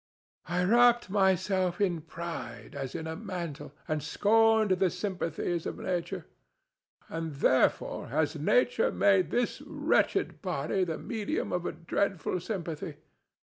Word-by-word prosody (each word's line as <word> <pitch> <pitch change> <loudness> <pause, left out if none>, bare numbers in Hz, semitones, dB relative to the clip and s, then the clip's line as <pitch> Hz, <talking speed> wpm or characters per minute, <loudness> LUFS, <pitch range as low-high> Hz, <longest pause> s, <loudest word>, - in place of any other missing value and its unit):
I 175 +1 0
wrapped 240 +1 +4
myself 190 -2 +2
in 180 -5 +1
pride 165 -7 -7
as 135 -2 -5
in 160 - -4
a 160 0 -4
mantle 175 -8 -6 0.2
and 155 -1 -1
scorned 220 +2 +3
the 185 0 +3
sympathies 175 -3 -2
of - - -5
nature, 180 -2 -3 0.8
and 165 -2 -4
therefore 140 - +2
has - - 0
Nature - - +2
made 195 -2 +3
this 245 0 0
wretched - - 0
body 180 0 -1
the 160 -2 -3
medium 220 -4 -3
of 180 -1 -1
a - - -1
dreadful 180 +3 -1
sympathy. 165 -6 -4
180 Hz, 130 wpm, -29 LUFS, 165-205 Hz, 0.8 s, wrapped